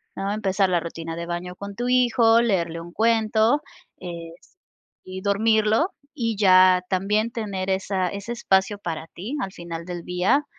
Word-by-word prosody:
¿no? 195 +1 -2
Empezar 195 -2 +1
la 175 -1 +2
rutina 165 0 -6
de 170 - -4
baño 175 +1 -5
con 200 0 -7
tu 240 +3 -2
hijo, 235 -2 +4
leerle 170 -7 0
un 170 +1 -10
cuento, 225 +3 +2 0.4
es 170 - -10 0.5
y 185 0 -8
dormirlo 220 - +2 0.2
y 230 -7 -2
ya 185 -2 +6
también 210 +4 0
tener 200 -5 -4
esa 190 -1 0
ese 200 +4 -6
espacio 195 -3 +1
para 165 -5 -5
ti 205 - -7
al 195 - -3
final 170 -2 -7
del 175 -1 -6
día 180 +11 +1
195 Hz, 160 wpm, -24 LUFS, 180-220 Hz, 0.5 s, ya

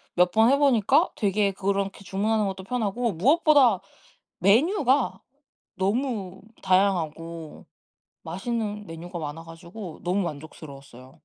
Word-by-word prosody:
몇 180 0 +3
번 220 +4 +4
해 280 - +4
보니까 255 -8 +3
되게 200 0 +1
그렇게 195 0 -2
주문하는 210 +3 0
것도 190 -1 -5
편하고 235 -1 -1
무엇보다 270 - +4 0.6
메뉴가 265 - +2 0.6
너무 200 -2 -2 0.2
다양하고 170 -4 -1 0.6
맛있는 210 +4 -4
메뉴가 170 +1 -7
많아 155 +2 -6
가지고 170 +2 -10
너무 185 +3 0
만족스러웠어요. 140 -5 -10
195 Hz, 285 characters per minute, -25 LUFS, 170-225 Hz, 0.6 s, 번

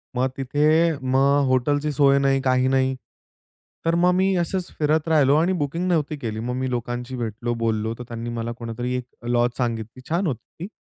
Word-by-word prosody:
मग 130 +1 +2
तिथे 145 +3 +1 0.5
मग 140 +1 +4
हॉटेलची 145 +4 +1
सोय 140 0 +4
नाही, 135 -1 +2
काही 130 0 +2
नाही. 130 0 +2 0.9
तर 165 0 +2
मग 180 +1 +4
मी 190 +1 +2
असंच 175 +1 -1
फिरत 155 +1 +1
राहिलो 145 -3 +4
आणि 175 +4 +2
बुकिंग 165 +6 -2
नव्हती 155 -4 0
केली. 110 -5 -4
मग 125 +2 -3
मी 130 0 -2
लोकांशी 120 +1 -4
भेटलो, 115 +1 -3
बोललो. 110 -1 -1
तर 125 - -5
त्यांनी 115 0 -5
मला 115 0 -3
कुणीतरी 120 +2 -4
एक 125 - -3 0.2
लॉज 120 0 +2
सांगितली. 115 0 -3
छान 175 +3 +1
होती 130 -7 -2 0.2
ती. 185 - -4
130 Hz, 185 wpm, -23 LUFS, 120-150 Hz, 0.9 s, मग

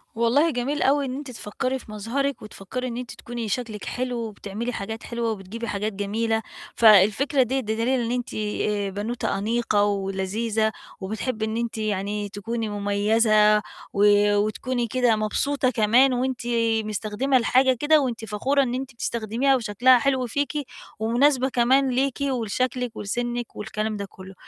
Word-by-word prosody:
والله 245 +8 +3
جميل 270 +3 -2
أوي 280 +1 +3
إن 255 -1 -4
أنتِ 280 -1 -7
تفكّري 255 +3 -3
في 220 - -13
مظهرِك، 250 +7 -2
وتفكّري 215 +4 -6
إن 235 -1 -5
أنتِ 250 -1 -6
تكوني 235 -2 -6
شكلِك 215 -2 -3
حلو، 250 0 -3
وبتعملي 225 +1 -5
حاجات 220 +3 -5
حلوة 235 -1 -2
وبتجيبي 220 +3 -6
حاجات 210 0 -2
جميلة، 220 +3 -1 0.3
فالفكرة 220 +6 +5
دي 265 +3 -1
ده 220 -2 -2
دليل 245 +4 +1
إن 235 0 -2
أنتِ 245 -1 -3
آآ، 210 -1 -1
بنوتة 215 +2 -2
أنيقة 215 0 +1
ولذيذة 205 +3 0 0.3
وبتحبي 220 +3 -3
إن 220 +1 -3
أنتِ 235 -1 -3
يعني 205 -1 -2
تكوني 220 +2 -4
مميّزة 210 +1 +3 0.4
و 205 0 +4
وتكوني 235 +4 -1
كده 245 -1 +2
مبسوطة 255 +6 0
كمان 245 +3 +4
وأنتِ 255 0 -1 0.4
مستخدمة 215 +5 0
الحاجة 260 +2 +3
كده 310 +1 +5
وأنتِ 235 -4 -3
فخورة 260 +7 +1
إن 245 -2 -2
أنتِ 265 0 -5
بتستخدميها، 235 +3 0
وشكلها 245 +2 +4
حلو 265 -1 +1
فيكِ، 285 +5 -2 0.5
ومناسبة 255 +4 +3
كمان 260 +2 +3
ليكِ، 260 +1 0
ولشكلِك، 250 -1 -1
ولسنِك، 240 +3 -3
والكلام 215 +1 -3
ده 200 - -4
كلّه، 190 0 -12
230 Hz, 150 wpm, -24 LUFS, 210-255 Hz, 0.5 s, فالفكرة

